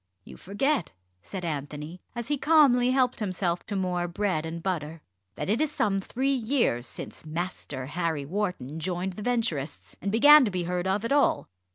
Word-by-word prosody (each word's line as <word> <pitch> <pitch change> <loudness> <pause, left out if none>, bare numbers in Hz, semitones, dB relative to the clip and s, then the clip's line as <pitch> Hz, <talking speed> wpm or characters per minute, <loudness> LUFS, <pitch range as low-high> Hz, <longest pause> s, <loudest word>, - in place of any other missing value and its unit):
"You - - -12
forget," 205 - -1 0.3
said 180 - -6
Anthony, 150 +2 -5
as 235 +1 -5
he 295 - +2
calmly 275 -6 +5
helped 255 -1 +2
himself 185 -4 -1
to 205 - -3
more 180 -2 -1
bread 170 -3 -1
and 165 +1 -6
butter, 165 -4 -3 0.3
"that - - -4
it 215 +7 +1
is 310 -1 +1
some 200 -8 +1
three 260 +7 -1
years 230 - +1
since - - -5
Master 160 -4 -4
Harry 160 -1 -2
Wharton 165 -5 -3
joined 180 +2 -2
the 210 - -8
Venturists 155 - -2
and 200 - -2
began 290 +7 +8
to 230 - +1
be 180 -2 -2
heard 180 +1 -2
of 200 +4 0
at 230 - -3
all. 285 0 +2
185 Hz, 180 wpm, -27 LUFS, 165-235 Hz, 0.3 s, began